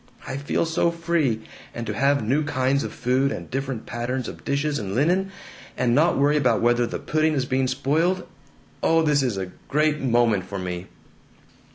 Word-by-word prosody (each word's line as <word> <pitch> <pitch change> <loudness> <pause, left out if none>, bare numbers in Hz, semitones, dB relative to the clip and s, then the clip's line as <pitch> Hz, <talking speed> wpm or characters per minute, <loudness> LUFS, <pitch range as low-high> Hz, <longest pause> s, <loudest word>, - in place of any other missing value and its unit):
I - - -4
feel 145 +4 0
so 165 +1 +1
free. 165 -9 0 0.3
And 120 - -4
to 110 - -3
have 140 +3 +2
new 140 +6 +2
kinds 135 -1 +1
of - - -4
food, 130 +3 +1
and 85 - -6
different 135 -3 -3
patterns 120 +2 -3
of - - -9
dishes 140 0 0
and 100 -2 -4
linen, 180 +8 +2 0.5
and 120 -2 +2
not 155 +6 +3
worry 145 +2 +3
about 125 -6 +2
whether 120 0 +2
the - - -4
pudding 155 0 +1
is 130 -2 0
being 130 -1 +1
spoiled! 155 +8 0 0.6
Oh, 165 0 +3
this 150 -2 +3
is 125 -7 -1
a 95 -1 -4 0.2
great 150 +1 +2
moment 120 -7 +2
for 100 +1 -6
me!" 90 0 -5
135 Hz, 185 wpm, -24 LUFS, 120-150 Hz, 0.6 s, not